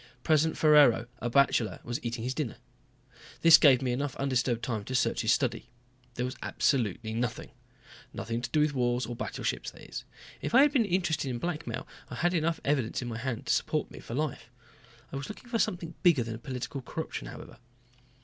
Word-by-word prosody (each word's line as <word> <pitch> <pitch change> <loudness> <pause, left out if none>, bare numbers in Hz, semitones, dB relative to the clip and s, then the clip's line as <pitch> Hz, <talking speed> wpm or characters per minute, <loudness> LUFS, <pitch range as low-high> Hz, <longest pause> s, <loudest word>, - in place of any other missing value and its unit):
President 160 0 +2
Ferraro, 145 -7 +6
a 120 - -2
bachelor, 120 -5 +2
was 120 0 -4
eating 120 -1 -3
his 125 +2 -1
dinner. 140 -5 -3 0.8
This 165 -1 +9
gave 135 -3 +6
me 125 - 0
enough 140 +2 -2
undisturbed 125 -3 0
time 110 -4 -2
to 130 - -3
search 115 -2 +1
his 110 - +2
study. 120 -1 0 0.5
There 125 - -1
was 130 +2 -4
absolutely 110 -4 0
nothing. 115 0 -3 0.6
Nothing 115 +1 -4
to - - -4
do 155 - +2
with 150 -1 +2
wars 125 -1 +1
or 120 - -5
battleships - - -3
that - - -15
is. - - -6 0.4
If - - -1
I 270 - +9
had 295 - +4
been 255 -6 +3
interested 170 -7 0
in 125 - -2
blackmail 165 +3 -4 0.2
I - - -6
had 175 +1 +1
enough 165 -1 0
evidence 135 -4 0
in 120 - -4
my 115 -1 -5
hand 125 -2 -3
to - - +2
support - - -1
me - - -10
for 115 - -7
life. 140 -5 -3 0.6
I - - -4
was 140 - -6
looking 225 +3 -10
for 230 -1 0
something 175 -6 -1
bigger 165 -9 +4
than 115 0 -6
political 130 +2 -5
corruption, - - -5
however. - - -10
130 Hz, 195 wpm, -29 LUFS, 120-155 Hz, 0.8 s, This